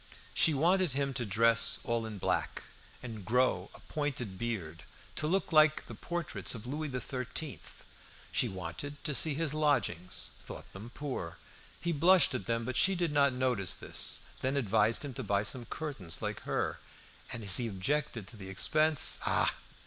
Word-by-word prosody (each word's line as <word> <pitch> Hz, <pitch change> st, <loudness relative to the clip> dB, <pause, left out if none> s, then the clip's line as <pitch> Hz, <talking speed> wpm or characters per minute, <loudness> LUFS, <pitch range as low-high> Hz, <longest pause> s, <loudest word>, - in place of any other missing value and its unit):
She 160 Hz, -, +4 dB
wanted 175 Hz, +1 st, +3 dB
him 140 Hz, 0 st, -1 dB
to 120 Hz, -3 st, -3 dB
dress 115 Hz, +3 st, +4 dB
all 115 Hz, -1 st, -1 dB
in 110 Hz, -2 st, -6 dB
black, -, -, -1 dB, 0.4 s
and 110 Hz, -5 st, -7 dB
grow 125 Hz, +6 st, +1 dB
a -, -, -11 dB
pointed 130 Hz, -, -3 dB
beard, 95 Hz, -9 st, -4 dB, 0.4 s
to 150 Hz, -, +1 dB
look 190 Hz, +4 st, 0 dB
like 155 Hz, 0 st, +5 dB
the -, -, -9 dB
portraits 175 Hz, -6 st, -1 dB
of 115 Hz, 0 st, -7 dB
Louis 150 Hz, +4 st, -3 dB
XIII. 130 Hz, +3 st, -4 dB, 0.7 s
She -, -, +2 dB
wanted 95 Hz, -, -6 dB
to 150 Hz, -3 st, -2 dB
see 150 Hz, +1 st, +2 dB
his 155 Hz, -1 st, 0 dB
lodgings; 120 Hz, -, -1 dB
thought -, -, -10 dB
them 105 Hz, +5 st, -8 dB
poor. 120 Hz, -, -5 dB, 0.4 s
He 170 Hz, -, -1 dB
blushed 175 Hz, +4 st, +6 dB
at 95 Hz, -, -4 dB
them, 115 Hz, 0 st, 0 dB
but 130 Hz, +1 st, -1 dB
she 195 Hz, +4 st, +5 dB
did 175 Hz, -3 st, 0 dB
not 140 Hz, -2 st, +4 dB
notice 125 Hz, -8 st, 0 dB
this, -, -, -3 dB, 0.2 s
then 135 Hz, +2 st, 0 dB
advised 115 Hz, +1 st, +2 dB
him 140 Hz, -, -5 dB
to 130 Hz, -, -5 dB
buy 100 Hz, -1 st, +1 dB
some 120 Hz, +4 st, 0 dB
curtains 110 Hz, -, -3 dB
like -, -, -3 dB
hers, -, -, -2 dB, 0.5 s
and 115 Hz, -, -5 dB
as 100 Hz, -3 st, +5 dB
he 120 Hz, -, -1 dB
objected 115 Hz, +3 st, -1 dB
to -, -, -10 dB
the 95 Hz, -2 st, -8 dB
expense 155 Hz, +10 st, +4 dB
"Ah! -, -, +3 dB
125 Hz, 170 wpm, -32 LUFS, 105-150 Hz, 0.7 s, blushed